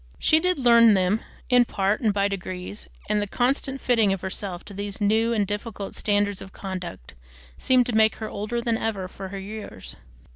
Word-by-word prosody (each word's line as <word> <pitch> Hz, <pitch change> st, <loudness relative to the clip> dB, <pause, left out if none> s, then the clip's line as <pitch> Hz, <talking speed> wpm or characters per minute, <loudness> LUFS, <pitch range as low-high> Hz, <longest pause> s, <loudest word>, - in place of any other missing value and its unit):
She 315 Hz, -, +4 dB
did 365 Hz, +2 st, +1 dB
learn 235 Hz, -4 st, +6 dB
them, 190 Hz, +3 st, +2 dB, 0.3 s
in 250 Hz, -1 st, +5 dB
part, 200 Hz, -2 st, 0 dB
and 220 Hz, -3 st, +3 dB
by 200 Hz, 0 st, +1 dB
degrees, 185 Hz, 0 st, -6 dB, 0.2 s
and 210 Hz, 0 st, +1 dB
the 205 Hz, -, -2 dB
constant 270 Hz, +4 st, 0 dB
fitting 225 Hz, -6 st, +3 dB
of 195 Hz, -2 st, -2 dB
herself 190 Hz, -1 st, -4 dB
to 205 Hz, -, -10 dB
these 200 Hz, +1 st, -5 dB
new 220 Hz, +3 st, +2 dB
and 215 Hz, -3 st, +1 dB
difficult 205 Hz, 0 st, -5 dB
standards 205 Hz, -1 st, 0 dB
of 190 Hz, -, -9 dB
conduct 185 Hz, -, -7 dB, 0.4 s
seemed 255 Hz, -1 st, +3 dB
to 245 Hz, -, -2 dB
make 220 Hz, 0 st, +4 dB
her 220 Hz, -, -5 dB
older 215 Hz, +4 st, -3 dB
than 230 Hz, -1 st, 0 dB
ever 200 Hz, -4 st, -2 dB
for 190 Hz, +1 st, -8 dB
her 195 Hz, +1 st, -7 dB
years. 200 Hz, -, -7 dB
205 Hz, 190 wpm, -25 LUFS, 195-230 Hz, 0.4 s, learn